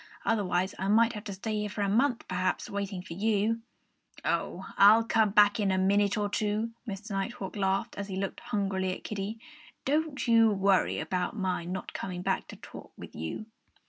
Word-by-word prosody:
Otherwise 190 -4 +1
I 190 - -1
might 225 +3 +4
have 210 -1 -7
to 200 - -4
stay 215 +3 -3
here 210 0 -2
for 205 0 -2
a - - +1
month, 245 +4 +1
perhaps, 185 0 -1
waiting 200 -2 -3
for 180 - -8
you." 215 +3 +1 0.6
"Oh! - - -1
I'll 210 +3 +7
come 225 -1 +3
back 205 +3 +5
in 205 -2 +2
a 190 - +2
minute 200 +2 +3
or 205 -1 +1
two," 210 +2 -1 0.2
Mr. 205 +1 -6
Nighthawk 195 0 -3
laughed, 195 -1 0
as 200 - -4
he 190 - -5
looked 195 0 -3
hungrily 190 -2 -1
at - - -12
Kiddie. 210 +1 -4 0.5
"Don't 295 -1 0
you 230 -1 +6
worry 195 -2 +2
about 180 +3 -2
my 185 -4 -1
not 180 +1 -5
coming 180 -1 -5
back - - -1
to - - -9
talk - - -11
with - - -10
you!" 80 - -5
200 Hz, 190 wpm, -29 LUFS, 190-220 Hz, 0.6 s, I'll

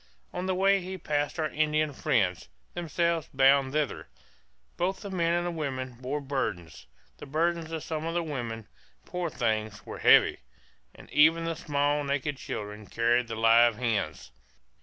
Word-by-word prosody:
On 185 - -3
the 185 - 0
way 195 0 +3
we 190 +1 -5
passed 145 -3 -2
our 155 - +1
Indian 155 -1 +1
friends, 100 - 0 0.2
themselves 170 -1 -1
bound 135 0 +5
thither; 150 -4 -2 0.7
both 190 +2 -1
the 200 -2 -7
men 170 -3 +1
and 175 0 0
the 175 - -1
women 130 -6 -4
bore 135 +4 -2
burdens 130 - -4 0.3
the - - -10
burdens 165 +2 0
of 160 -2 -4
some 160 -1 -4
of 165 - -3
the 175 - +1
women, 120 -8 -5 0.4
poor 180 -2 -3
things, 110 -5 -2
were - - -7
heavy - - +5 0.6
and - - -14
even 165 +2 +5
the 165 0 -2
small 145 -2 0
naked 140 0 -2
children 105 -3 -6
carried 120 +1 +1
the 115 - -5
live 115 +1 +5
hens. 105 - -2
145 Hz, 160 wpm, -28 LUFS, 120-165 Hz, 0.7 s, bound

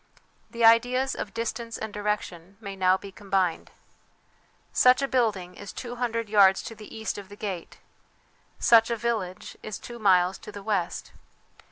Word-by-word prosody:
The 235 -1 +1
ideas 245 +4 +4
of 200 - -5
distance 230 0 -4
and 220 -1 -6
direction 200 -3 -3
may 200 -3 -7
now 185 0 +3
be 200 0 -10
combined. 190 -4 -1 1.0
Such 255 +2 +5
a - - +1
building 210 -9 0
is 205 -2 -9
two 245 -1 -7
hundred 230 -2 -1
yards 200 -2 +5
to - - -7
the 215 -1 -12
east 220 -1 -3
of 200 0 -11
the 205 - -10
gate, 195 -5 -6 0.8
such 230 -1 +5
a 235 - -1
village 210 -6 -3
two 235 +3 -7
miles 185 -3 +3
to - - -10
the 205 -1 -9
west. 195 -5 -2
210 Hz, 160 wpm, -26 LUFS, 195-230 Hz, 1.0 s, Such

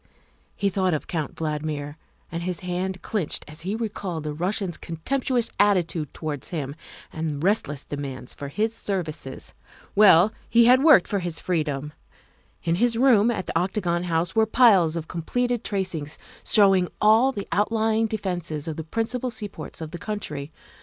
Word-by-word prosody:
He 200 -1 0
thought 185 -3 +1
of 150 - -4
Count 160 -4 -3
Valdmir, 150 -2 -3 0.4
and 170 0 -3
his 180 -1 -3
hand 185 0 -3
clinched 195 -9 -2
as 150 +1 -7
he 190 +5 -2
recalled 200 -7 -4
the 150 -1 -3
Rus 180 +7 -1
sian's 185 -5 -2
contemptuous 245 +8 -1
attitude 175 -7 +2
towards 150 -4 -5
him 145 -5 -4 0.4
and 160 -1 -2
relentless 150 -3 0
demand 135 -3 -6
for 140 - -7
his 215 +9 -1
services. 170 -11 -4 0.4
Well, 200 0 +6 0.2
he 235 0 +6
had 255 +3 +6
worked 300 - +7
for 200 - 0
his 175 -3 -3
freedom. 150 -4 -2 0.7
In 165 - +1
his 240 -1 +3
room 235 -4 +5
at 215 -6 -2
the - - -6
Octagon 180 -2 -1
House 170 +1 -1
were 220 0 +4
piles 200 -9 +5
of 165 -2 -4
completed 245 +8 -1
tracings 180 -7 -3 0.3
showing 195 -4 +5
all 225 +5 +5
the 200 -6 -6
outlying 220 +1 +1
defences 175 -8 -3
of 160 - -4
the 160 - -4
principal 230 +8 -2
seaports 215 -7 -6
of 155 -1 -6
the 175 - -7
country. 180 -9 -5
180 Hz, 160 wpm, -24 LUFS, 160-215 Hz, 0.7 s, worked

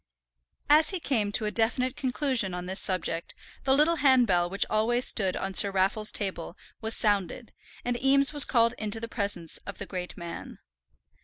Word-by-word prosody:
As 305 +2 +4
he 375 - -2
came 225 -10 -2
to 215 - +1
a 210 - -3
definite 250 +3 -1
conclusion 255 -7 -2
on 180 0 -7
this 190 +2 -1
subject 170 -3 -1 0.3
the 265 0 +2
little 325 +3 +2
handbell 245 - +2
which 195 +2 +1
always 235 +3 0
stood 190 -4 +1
on 195 0 -5
Sir 200 - +8
Raffle's 195 +3 0
table 185 -3 -5 0.2
was 225 0 +1
sounded, 205 +2 -2 0.3
and 245 +1 -3
Eames 275 +2 +3
was 290 -2 +8
called 230 -2 +1
into 215 +1 -3
the 230 - -6
presence 200 -7 -4
of 200 - -8
the - - -7
great 180 -1 -8
man. 170 -1 -9
215 Hz, 175 wpm, -26 LUFS, 190-255 Hz, 0.3 s, Sir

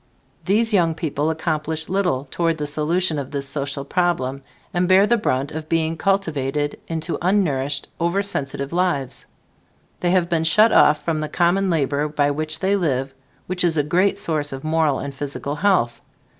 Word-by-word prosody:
These 220 +4 +2
young 170 -5 +3
people 155 -1 -1
accomplish 160 0 -2
little 180 -8 0
toward 165 -2 0
the 150 - -3
solution 155 +2 0
of 135 - -5
this 140 -1 -3
social 140 0 -3
problem, 140 -7 0 0.3
and 175 0 +1
bear 190 +2 +6
the 235 - +3
brunt 140 - -1
of 155 0 -6
being 165 0 +1
cultivated 150 -7 -1
into 165 +1 -3
unnourished, 145 -8 +1
oversensitive 170 -6 -1
lives. 170 -7 -1 0.7
They 175 - 0
have 180 -1 +2
been 165 -2 0
shut 215 +7 +5
off 150 0 +4
from 160 -2 0
the 155 0 -3
common 185 +2 +2
labor 145 -2 0
by 145 -1 +1
which 155 +1 -3
they 195 +1 +2
live 135 -7 -1 0.3
which 180 0 -2
is 165 -2 +1
a 145 - +3
great 185 +6 +2
source 155 -6 -1
of 135 0 -7
moral 155 -3 +1
and 140 0 -5
physical 140 +1 -4
health. 135 -11 +1
160 Hz, 170 wpm, -21 LUFS, 145-180 Hz, 0.7 s, bear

